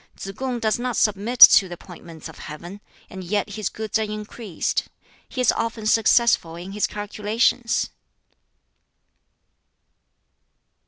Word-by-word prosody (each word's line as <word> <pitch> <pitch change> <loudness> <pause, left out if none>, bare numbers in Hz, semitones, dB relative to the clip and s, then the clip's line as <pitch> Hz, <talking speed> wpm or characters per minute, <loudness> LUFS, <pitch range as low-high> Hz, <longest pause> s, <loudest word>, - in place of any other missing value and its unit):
Tsz 195 - -7
kung 255 0 -3
does 220 0 0
not 245 -1 -3
submit 210 +4 0
to 195 - +10
the 175 - -8
appointments 170 -3 -12
of - - -13
Heaven; 175 +7 -10 0.3
and 190 0 -9
yet 205 +3 -2
his 205 -1 -3
goods 220 0 -3
are - - -1
increased; 210 -2 -4 0.4
he 255 - -4
is 250 - +4
often 225 -1 -4
successful 225 -6 +3
in 175 +3 -9
his 210 +1 -1
calculations." 215 +3 -1
210 Hz, 125 wpm, -22 LUFS, 190-230 Hz, 0.4 s, to